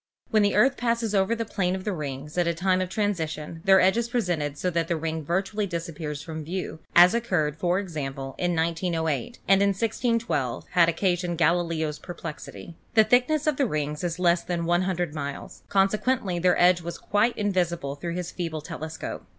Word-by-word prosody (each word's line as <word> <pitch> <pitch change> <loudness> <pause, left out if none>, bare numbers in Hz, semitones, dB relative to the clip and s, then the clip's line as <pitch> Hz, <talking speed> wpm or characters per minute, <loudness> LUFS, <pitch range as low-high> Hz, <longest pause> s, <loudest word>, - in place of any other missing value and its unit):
When 215 - +4
the 205 0 +2
Earth 270 +1 +4
passes 230 -2 0
over 195 +3 +2
the 230 0 -3
plane 185 -3 -1
of 190 - -6
the 210 - -2
rings 145 -2 -6
at 175 -1 +2
the 170 0 0
time 185 +2 +1
of 185 - -2
transition 165 -6 -2
their 190 0 +7
edge 190 +4 +4
is 235 0 -1
presented 175 - -1
so 180 +4 -1
that 165 -1 0
the 170 - 0
ring 160 0 -3
virtu 190 +7 -1
ally 210 - +2
disappears 165 -4 -5
from 160 0 -6
view, 175 0 -5 0.2
as 175 +1 +8
occurred, 180 -11 0
for 175 +2 +1
example, 135 -8 -4
in 175 -1 0
1908, 165 - -1
and 195 0 +5
in 200 - +4
1612 225 - -1
had 170 -2 +5
occasioned 175 0 0
Galileo's 165 -2 +1
perplexity. 170 -1 -8 0.2
The 220 - +8
thickness 250 +7 +2
of 305 -3 +1
the 275 - +2
rings 150 -2 -3
is 170 -1 -2
less 175 -1 +3
than 170 -1 -2
100 175 -1 0
miles; 140 -2 -6
conse 195 +1 +3
quently 200 -9 0
their 180 0 +3
edge 175 0 +5
was 170 +1 -6
quite 210 +4 +1
invisible 175 -8 0
through 170 +4 -5
his 180 -1 -4
feeble 165 -3 -4
telescope. 160 0 -6
175 Hz, 190 wpm, -26 LUFS, 160-195 Hz, 0.2 s, as